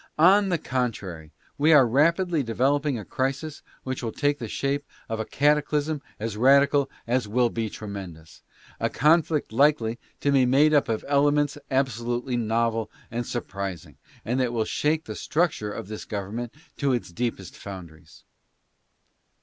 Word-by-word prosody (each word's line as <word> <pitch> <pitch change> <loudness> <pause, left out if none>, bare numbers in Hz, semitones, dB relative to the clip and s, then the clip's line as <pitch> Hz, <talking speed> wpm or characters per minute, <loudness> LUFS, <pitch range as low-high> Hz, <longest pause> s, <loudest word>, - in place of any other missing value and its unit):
On 195 +5 +5
the 175 - +1
contrary, 105 - -3 0.3
we 155 +3 +4
are 135 -5 +7
rapidly 165 +6 +2
developing 135 +3 +1
a 105 - -7
crisis 140 +3 -3 0.2
which 130 -1 -4
will 115 -2 -3
take 145 +2 0
the 115 - -5
shape 140 +5 -1 0.2
of 110 0 -3
a 110 - -2
cataclysm 150 +1 +1 0.2
as 110 0 -3
radical 140 +3 +4 0.2
as 120 -1 0
it - - -11
will 120 +1 +2
be 115 -2 -2
tremendous; 95 -7 -9 0.4
a - - 0
con 160 +4 +4
flict 150 -4 -3
likely 120 -2 +2 0.2
to 145 - +2
be 135 -2 +4
made 140 +5 +4
up 145 -5 +3
of 110 -1 -2
elements 145 0 +2
absolutely 125 -1 -1
novel 115 -1 0 0.2
and 120 +1 -3
sur 120 - -2
prising, 100 -4 -6 0.3
and 120 +5 0
that 125 -2 0
will 110 -2 0
shake 155 +7 0
the - - -5
structure 150 -11 -1
of 95 - -6
this 110 0 -6
government 110 +4 -4 0.3
to 140 -2 +1
its 120 -7 -3
deepest 105 -3 -4
foundations. 85 -5 -11
125 Hz, 160 wpm, -25 LUFS, 110-145 Hz, 0.4 s, are